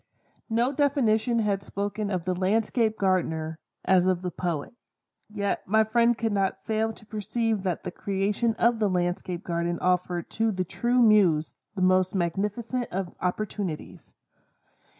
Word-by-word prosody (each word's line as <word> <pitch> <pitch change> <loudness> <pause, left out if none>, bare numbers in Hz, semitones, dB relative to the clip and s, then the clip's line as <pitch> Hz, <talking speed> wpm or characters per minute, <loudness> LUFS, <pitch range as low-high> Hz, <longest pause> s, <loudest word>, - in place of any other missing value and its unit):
No 235 +3 +2
definition 255 -5 +2
had 205 -3 +1
spoken 200 +1 -3
of 180 -4 -2
the 185 - +1
Landscape 220 +4 +1
Gardener, 160 -4 0 0.3
as 185 -1 +4
of 185 -1 +1
the 180 - -2
poet; 170 - -3 0.6
yet 200 -1 -2
my 220 +3 +4
friend 235 +1 +3
could 225 -1 -1
not 195 -1 -1
fail 220 0 0
to 220 - -14
perceive 220 0 -1
that 185 -3 -2
the - - -4
creation 200 +5 -1
of 235 0 +2
the 210 -2 +2
Landscape 175 0 -1
Garden 170 0 -1
offered 180 -1 0
to 225 0 +1
the 185 -2 -2
true 240 +7 +2
muse 190 -8 +4 0.2
the 185 - 0
most 185 +1 +3
magnificent 210 +8 -1
of 185 -1 -3
opportunities. 185 -2 -4
200 Hz, 150 wpm, -26 LUFS, 180-225 Hz, 0.6 s, as